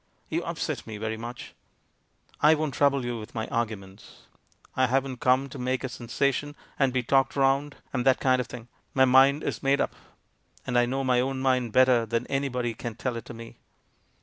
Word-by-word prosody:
"You - - -1
upset - - -4
me 110 -1 -6
very 110 +1 -3
much." 120 +2 -8 0.9
"I 155 +1 +6
won't 155 -2 -2
trouble 140 -1 +2
you 120 -1 -3
with 110 +3 -11
my 110 -1 -2
arguments; 105 -4 -5 0.5
I 130 0 +3
haven't 130 0 -1
come 130 +2 +3
to 135 - -9
make 130 +1 -1
a 130 - -2
sensation, 140 +4 -2 0.2
and 135 -2 +3
be 125 -1 0
talked 135 +2 +2
round, 140 +1 +1 0.2
and 125 -2 0
that 130 0 +4
kind 130 -1 +3
of - - -6
thing. 120 -1 -9 0.3
My 130 -1 +6
mind 135 +3 +5
is - - -3
made 135 0 +2
up, - - 0 0.7
and 125 - -3
I 120 0 +4
know 135 +2 -1
my 125 -1 +2
own 135 +1 -2
mind 130 -3 +1
better 125 -1 +4
than 115 +2 -1
any 135 0 0
body 120 -2 -2
can 115 0 -6
tell 125 +1 -3
it 115 - -6
to 120 - -9
me. 115 0 -11
130 Hz, 205 wpm, -27 LUFS, 120-135 Hz, 0.9 s, I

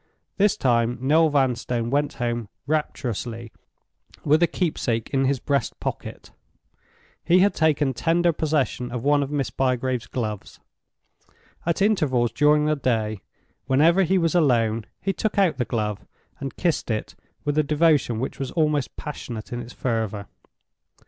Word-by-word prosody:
This 205 0 +3
time 120 -1 +1
Noel 155 +5 +4
Vanstone 125 -4 0
went 145 +1 +1
home 120 -3 -3 0.2
rapturously 120 -6 -3 0.7
with 155 +3 +4
a 170 - +5
keepsake 125 - -2
in 135 -1 +2
his 135 0 +1
breast 140 +1 -1
pocket; - - -6 0.9
he 175 - +4
had 200 +1 +4
taken 150 -3 +2
tender 170 +6 +2
possession 145 -6 -1
of 120 -1 -4
one 145 0 +3
of 140 - -2
Miss 140 -5 -2
Bygrave's 130 -1 -1
gloves. 110 -5 -5 1.1
At 170 +3 +1
intervals 135 - +2
during 150 0 +3
the 155 0 +2
day, 110 -7 -1 0.5
whenever 160 +8 +4
he 190 +1 +2
was 165 -2 +1
alone, 115 -9 +2
he 195 - -1
took 215 +1 -2
out 190 -5 +3
the 125 - +1
glove 105 -2 -2 0.4
and 135 -1 -6
kissed 170 -8 0
it 110 -2 -2 0.3
with 145 0 0
a - - +4
devotion 150 -6 +2
which 130 - -4
was 135 -2 -3
almost 150 -4 0
passionate 120 -7 -7
in 120 - -3
its 120 +1 -9
fervor. 110 -5 -2
135 Hz, 150 wpm, -24 LUFS, 120-155 Hz, 1.1 s, a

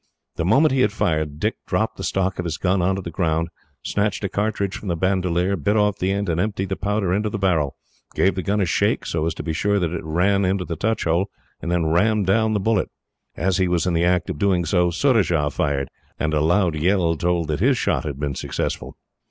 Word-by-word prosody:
The 80 - -2
moment 135 - +4
he 130 -1 +2
had 105 - +3
fired, 75 -7 -1
Dick - - -1
dropped - - -1
the - - -6
stock 95 -1 -1
of 90 - -2
his 85 -1 -2
gun 95 0 +1
on 95 +2 +1
to 95 - -5
the 85 - -6
ground, 80 0 0 0.3
snatched 105 +1 -1
a 100 - -1
cartridge 100 -1 -1
from 105 - -7
the 85 - 0
bandolier, 90 +1 +1
bit 100 +6 0
off 105 -1 +2
the 95 +1 0
end, 100 +1 -1
and 85 0 0
emptied 100 -2 -2
the 95 - -1
powder 100 -2 -1
into 105 +2 0
the 105 - -3
barrel, 85 -8 +1 0.4
gave 95 - +3
the 95 - -3
gun 100 +3 0
a - - +2
shake, 80 - +1
so 80 -1 -1
as 85 - -2
to - - -6
be 80 - -2
sure 100 +5 +1
that 85 -3 -1
it 85 - -4
ran 90 +5 +1
into 95 0 0
the 85 - -4
touch 110 +7 -1
hole, 85 +4 +1 0.3
and 85 - -3
then 85 -2 +1
rammed 100 +6 +2
down 110 +3 +2
the - - +1
bullet. 105 -1 +1 0.5
As 90 +2 +1
he 95 - +2
was 90 -2 +1
in 90 - 0
the 85 0 +2
act 90 0 +2
of 75 - -7
doing 95 -3 +2
so, 90 -2 +2
Surajah 85 - +2
fired, 70 -2 -1 0.3
and 80 0 0
a 75 - +2
loud 85 +2 +2
yell 85 +1 +1
told 85 0 0
that 75 - -1
his 130 +5 +3
shot - - 0
had 70 -4 -5
been 75 -1 -2
successful. - - -4
90 Hz, 240 wpm, -22 LUFS, 85-100 Hz, 0.5 s, moment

